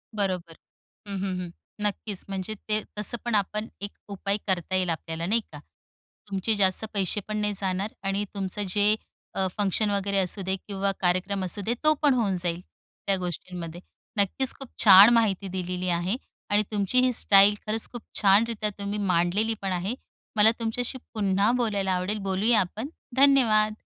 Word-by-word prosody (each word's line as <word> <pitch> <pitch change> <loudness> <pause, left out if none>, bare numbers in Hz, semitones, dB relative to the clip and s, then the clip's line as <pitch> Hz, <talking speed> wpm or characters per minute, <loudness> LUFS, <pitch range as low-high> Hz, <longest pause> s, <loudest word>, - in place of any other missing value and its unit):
बरोबर. 185 -5 -2 0.5
हं, 200 - -3
हं, 190 -1 -2
हं. 175 - -6 0.4
नक्कीच, 205 -1 -3
म्हणजे 195 +2 -4 0.2
ते 215 0 +1 0.2
तसं 210 +3 -1
पण 235 -2 0
आपण 210 +2 -1
एक 205 - -5 0.2
उपाय 200 +1 -2
करता 185 -1 -1
येईल 185 -1 +1
आपल्याला, 165 +1 -4
नाही 225 +6 +2
का? 150 - -9 0.7
तुमचे 195 +3 0
जास्त 195 +1 +1
पैसे 200 0 0
पण 215 0 -3
नाही 210 0 0
जाणार 195 +2 -2
आणि 200 +1 -1
तुमचं 200 +1 -3
जे 210 +1 +4 0.4
अ, 190 - +1
फंक्शन 205 +1 +1
वगैरे 200 0 0
असू 190 +2 +1
दे, 190 - +1
किंवा 195 0 -2
कार्यक्रम 185 +2 0
असू 190 +3 -1
दे, 235 - +1
तो 310 - +6
पण 290 -3 +4
होऊन 215 -7 +1
जाईल, 175 -1 -1 0.5
त्या 195 - +3
गोष्टींमध्ये. 175 -1 -6 0.4
नक्कीच 205 +7 +3
खूप 270 - -8 0.2
छान 200 +1 +10
माहिती 205 -4 +2
दिलेली 180 0 -3
आहे 175 +4 0 0.3
आणि 205 +1 +3
तुमची 210 +4 +1
ही 255 - +2
स्टाईल 200 +1 +6
खरंच 220 +1 -1
खूप 240 - -7 0.2
छानरीत्या 210 +2 +3
तुम्ही 200 +1 -3
मांडलेली 180 +6 +1
पण 195 -1 -2
आहे. 185 +7 -2 0.4
मला 215 +1 +6
तुमच्याशी 245 +3 -2 0.2
पुन्हा 200 0 +2
बोलायला 205 -5 0
आवडेल, 185 +4 -1
बोलूया 215 +4 +3
आपण, 215 +8 -3 0.3
धन्यवाद. 235 -6 +5
200 Hz, 165 wpm, -26 LUFS, 185-215 Hz, 0.7 s, छान